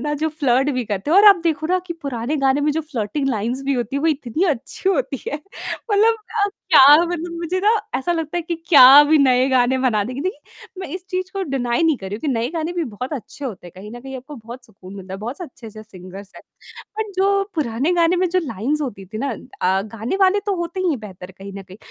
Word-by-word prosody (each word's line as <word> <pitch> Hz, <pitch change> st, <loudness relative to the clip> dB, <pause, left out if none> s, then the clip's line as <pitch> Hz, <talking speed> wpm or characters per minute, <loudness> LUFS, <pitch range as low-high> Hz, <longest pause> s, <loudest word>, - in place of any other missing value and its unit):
ना 295 Hz, -, -1 dB
जो 315 Hz, -, +2 dB
फ्लर्ट 280 Hz, -3 st, +1 dB
भी 255 Hz, -3 st, -2 dB
करते 205 Hz, +5 st, -4 dB
हैं 350 Hz, -, +4 dB
और 405 Hz, -, +7 dB
आप 400 Hz, -, +7 dB
देखो 315 Hz, -2 st, 0 dB
ना 365 Hz, +2 st, +1 dB
कि 345 Hz, -, -4 dB
पुराने 265 Hz, +1 st, -3 dB
गाने 275 Hz, 0 st, +2 dB
में 295 Hz, +1 st, +1 dB
जो 320 Hz, -, -1 dB
फ्लर्टिंग 270 Hz, -1 st, -3 dB
लाइन्स 240 Hz, +2 st, -2 dB
भी 275 Hz, -, 0 dB
होती 245 Hz, +2 st, -3 dB
है -, -, -1 dB
वो -, -, +2 dB
इतनी 300 Hz, +2 st, -1 dB
अच्छी 295 Hz, +7 st, -3 dB
होती 275 Hz, -7 st, -1 dB
है। -, -, -3 dB, 0.6 s
मतलब 435 Hz, +3 st, +4 dB, 0.5 s
क्या 295 Hz, +1 st, +8 dB
मुझे 340 Hz, +1 st, -3 dB
ना 415 Hz, +3 st, +3 dB, 0.3 s
ऐसा 310 Hz, +7 st, -1 dB
लगता 325 Hz, -1 st, -3 dB
है 345 Hz, -, -1 dB
कि 340 Hz, +1 st, -3 dB
क्या 280 Hz, -2 st, +9 dB
भी 310 Hz, +1 st, +4 dB
नए 260 Hz, -2 st, +3 dB
गाने 260 Hz, 0 st, +2 dB
बनाने 225 Hz, -1 st, 0 dB
की 270 Hz, -, -5 dB
देखिए 375 Hz, +8 st, -7 dB
मैं 375 Hz, -, -5 dB
इस 370 Hz, -1 st, -7 dB
चीज़ 370 Hz, 0 st, -3 dB
को 390 Hz, -, -3 dB
डिनाइ 245 Hz, +1 st, 0 dB
नहीं 320 Hz, -3 st, +3 dB
कर 195 Hz, -, -9 dB
रही 195 Hz, -, -5 dB
हूँ -, -, -13 dB
कि 310 Hz, -, -3 dB
नए 235 Hz, -2 st, 0 dB
गाने 330 Hz, 0 st, -3 dB
भी 350 Hz, -2 st, -2 dB
बहुत 250 Hz, +7 st, -6 dB
अच्छे 285 Hz, +1 st, -7 dB
होते 215 Hz, -8 st, -6 dB
हैं 175 Hz, -, -12 dB
कहीं 200 Hz, +3 st, -10 dB
न -, -, -10 dB
कहीं 265 Hz, +1 st, -8 dB
आपको 265 Hz, +4 st, -10 dB
बहुत 240 Hz, +2 st, -11 dB
सुकून 195 Hz, -4 st, -14 dB
मिलता 190 Hz, -1 st, -8 dB
है -, -, -7 dB
बहुत 235 Hz, -, -6 dB
अच्छे 255 Hz, -8 st, -11 dB
जैसे 215 Hz, +1 st, -11 dB, 0.2 s
सिंगर्स 190 Hz, +2 st, -11 dB
हैं। -, -, -12 dB, 0.6 s
बट 430 Hz, -2 st, -3 dB
जो 395 Hz, +1 st, +2 dB
पुराने 280 Hz, +1 st, -1 dB
गाने 345 Hz, 0 st, +2 dB
में 365 Hz, +1 st, +1 dB
जो 370 Hz, +2 st, +1 dB
लाइन्स 260 Hz, +4 st, -2 dB
होती 200 Hz, -8 st, -6 dB
थी 215 Hz, +3 st, -8 dB
ना 275 Hz, +3 st, -2 dB
अ, 190 Hz, -6 st, -2 dB
गाने 220 Hz, -, -4 dB
वाले 385 Hz, +1 st, +4 dB
तो 405 Hz, -, +1 dB
होते 345 Hz, +2 st, -4 dB
ही -, -, -2 dB
नहीं 340 Hz, -, +2 dB
हैं 265 Hz, -, -4 dB
बेहतर 190 Hz, -3 st, -10 dB
कहीं 195 Hz, +1 st, -11 dB
न 195 Hz, 0 st, -8 dB
कहीं। 190 Hz, 0 st, -14 dB
275 Hz, 250 wpm, -20 LUFS, 230-335 Hz, 0.6 s, क्या